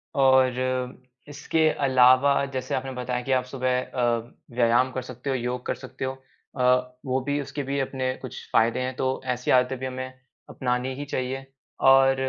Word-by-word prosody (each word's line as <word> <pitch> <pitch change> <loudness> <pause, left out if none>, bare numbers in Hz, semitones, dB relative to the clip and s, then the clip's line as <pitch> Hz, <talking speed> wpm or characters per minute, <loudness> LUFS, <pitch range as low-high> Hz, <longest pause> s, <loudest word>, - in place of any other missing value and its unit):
और 130 -1 +2 0.3
इसके 155 +2 +1 0.2
अलावा 130 +2 +5
जैसे 130 0 -2
आपने 135 0 -3
बताया 125 -1 -3
कि 135 - -3
आप 130 -1 +3
सुबह 130 -1 -1
अ, 120 -2 -1 0.2
व्यायाम 120 +2 +3
कर 130 - -3
सकते 125 +2 -7
हो, 135 - +1
योग 125 0 -3
कर - - -1
सकते - - -7
हो, 130 - -1 0.5
अ, 125 0 +2
वो 130 0 0
भी 145 +2 -1
उसके 145 +1 -5
भी 140 +1 -2
अपने 130 -1 -1
कुछ 130 - -8
फ़ायदे 115 +2 +3
हैं, 130 0 -3
तो 130 0 -1
ऐसी 125 0 -2
आदतें 125 0 +3
भी 130 - -4
हमें 130 0 -5 0.4
अपनानी 125 +1 -2
ही 145 +2 -5
चाहिए 135 -1 -3 0.4
और 135 0 +6
130 Hz, 175 wpm, -25 LUFS, 125-135 Hz, 0.5 s, और